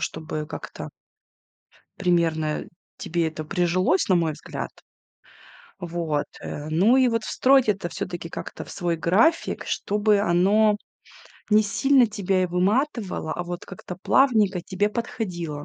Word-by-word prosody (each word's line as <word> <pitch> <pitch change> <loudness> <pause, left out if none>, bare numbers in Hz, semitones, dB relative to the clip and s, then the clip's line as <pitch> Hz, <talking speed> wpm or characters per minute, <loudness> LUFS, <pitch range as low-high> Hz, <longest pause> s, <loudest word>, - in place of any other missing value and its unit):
чтобы 155 -1 -4
как-то - - -8 1.1
примерно 165 -3 +1 0.3
тебе 170 0 -1
это 155 0 -7
прижилось 180 +2 +1
на 185 - +4
мой 165 -2 +1
взгляд - - -6 1.1
вот, 165 -4 -2
э, 150 +1 -6
ну 190 +11 +4
и 260 -1 +5
вот 230 -2 -1
встроить 265 0 +3
это 195 -4 0
всё-таки 175 -1 -5
как-то - - -7
в - - -13
свой 175 -2 -2
график, 210 - +2
чтобы 205 0 +1
оно 205 +4 +3 0.7
не 210 +1 +6
сильно 260 +5 +3
тебя 195 -3 0
и - - 0
выматывало, 200 - 0
а 175 - -3
вот 175 0 -6
как-то 180 -1 -9
плавненько 210 -3 +3
тебе 195 +3 -1
подходило. 175 -10 -4
185 Hz, 130 wpm, -24 LUFS, 170-215 Hz, 1.1 s, не